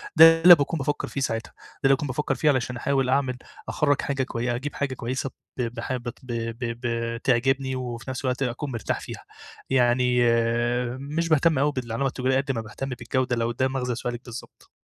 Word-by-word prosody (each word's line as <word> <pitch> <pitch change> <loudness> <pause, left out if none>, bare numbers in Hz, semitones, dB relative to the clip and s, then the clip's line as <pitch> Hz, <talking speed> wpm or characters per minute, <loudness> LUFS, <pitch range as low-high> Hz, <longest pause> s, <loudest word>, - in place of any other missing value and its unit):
ده 165 0 +8
اللي 175 +1 +11
باكون 150 +2 -1
بافكر 145 0 -2
فيه 140 - -4
ساعتها 115 -3 -2
ده - - -20
اللي 135 0 +6
باكون 145 - -4
بافكر 135 +3 -1
فيه 155 - +2
علشان 125 -2 0
أحاول 135 0 0
أعمل 130 -1 +1 0.3
أخرج 145 -2 +1
حاجة 140 -1 -1
كوي 120 -1 -2
أجيب 140 +4 -5
حاجة 140 -2 -2
كويسة 130 +2 -3 0.3
ب - - -1
بحا 120 +2 -3
ب 120 - -11
ب 120 - -3 0.2
ب 115 -1 -3 0.2
ب 125 - -1 0.3
بتعجبني 130 +2 +1
وفي 125 -1 -5
نفس 130 -1 -4
الوقت 125 +1 0
أكون 130 +3 -3
مرتاح 115 -4 -2
فيها. - - -8 0.5
يعني 125 -1 +3
آآ، 120 +1 +1
مش 155 +4 -2
باهتم 155 0 +4
أوي 145 +2 +3
بالعلامة 130 0 -2
التجارية 130 0 0
قد 135 +1 0
ما 115 -4 -2
باهتم 115 +5 -6
بالجودة 125 +1 -1
لو 115 0 0
ده 130 +2 +1
مغزى 125 -2 -2
سؤالِك 120 0 -4
بالضبط. 120 -1 -10
130 Hz, 200 wpm, -25 LUFS, 120-135 Hz, 0.5 s, اللي